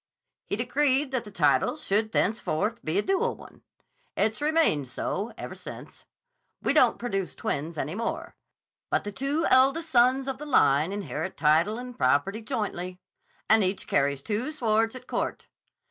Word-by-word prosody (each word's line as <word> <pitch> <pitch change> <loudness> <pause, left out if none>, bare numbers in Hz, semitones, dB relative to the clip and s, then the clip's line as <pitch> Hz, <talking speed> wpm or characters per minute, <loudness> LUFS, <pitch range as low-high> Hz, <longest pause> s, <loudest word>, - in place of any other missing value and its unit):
He - - -1
decreed 265 +4 +1
that 255 -3 -2
the - - -9
title 210 +8 +2
should 215 -4 +1
thenceforth 215 +2 0
be 155 +4 -1
a 205 - +2
dual 450 +5 0
one. - - -15 0.6
It's 220 +4 0
remained 300 - +2
so 200 - -3
ever - - -6
since. - - -11 0.5
We - - 0
don't - - +4
produce 195 -6 -3
twins 160 +3 -3
any 150 - -3
more, 230 +4 -4 0.5
but - - +1
the 205 - -5
two 280 +8 -1
eldest 275 +5 +4
sons 255 +2 +4
of 265 -1 -3
the 300 - -6
line 155 - +3
inherit 200 -2 -4
title 160 +8 +3
and 250 0 -7
property 190 - +1
jointly, 185 -5 -4 0.5
and 220 -1 +5
each 185 +1 -1
carries 140 -1 0
two 225 +7 -2
swords 225 -4 +1
at 255 0 -10
court. - - -3
220 Hz, 160 wpm, -27 LUFS, 185-260 Hz, 0.6 s, and